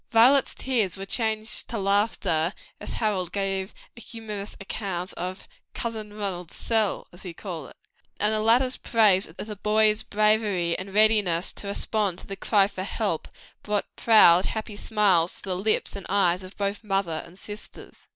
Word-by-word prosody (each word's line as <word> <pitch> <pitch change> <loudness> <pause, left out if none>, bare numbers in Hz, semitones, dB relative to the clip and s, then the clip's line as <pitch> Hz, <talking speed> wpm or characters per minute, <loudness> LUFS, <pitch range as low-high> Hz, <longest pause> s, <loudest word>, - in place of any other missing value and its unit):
Violet's 250 +4 +5
tears 220 -9 0
were 195 - -6
changed 220 +1 -1
to 230 - -3
laughter 200 -4 +1 0.2
as - - -6
Harold 195 -6 -1
gave 195 -1 -2 0.2
a 235 - -12
humorous 215 -4 -7
account 195 -2 -4
of 185 +2 -6 0.3
"Cousin 220 -3 -4
Ronald's 190 -5 -5
sell," 220 -3 0
as 175 - -14
he 175 -3 -8
called 170 -7 -7
it, - - -16 0.4
and 210 +1 +3
the 215 - +1
latter's 245 +4 +3
praise 210 -5 +3
of 160 - -16
the 210 0 -6
boy's 215 +1 +3
bravery 210 -5 +1
and 190 +1 -6
readiness 205 -5 +3
to 200 - -8
respond 200 -2 -1
to - - -8
the 195 - -6
cry 200 0 +3
for 195 -2 -6
help, 200 -4 -2 0.3
brought 210 -1 -2
proud, 190 -6 +6
happy 220 -1 -4
smiles 200 -6 +2
to 195 - -8
the 185 - +1
lips 205 +3 0
and 200 - -7
eyes 185 -2 +2
of 185 +1 -12
both 200 +1 -2
mother 195 -6 -1
and 170 +2 -15
sisters. 205 +2 -11
205 Hz, 170 wpm, -26 LUFS, 185-215 Hz, 0.4 s, proud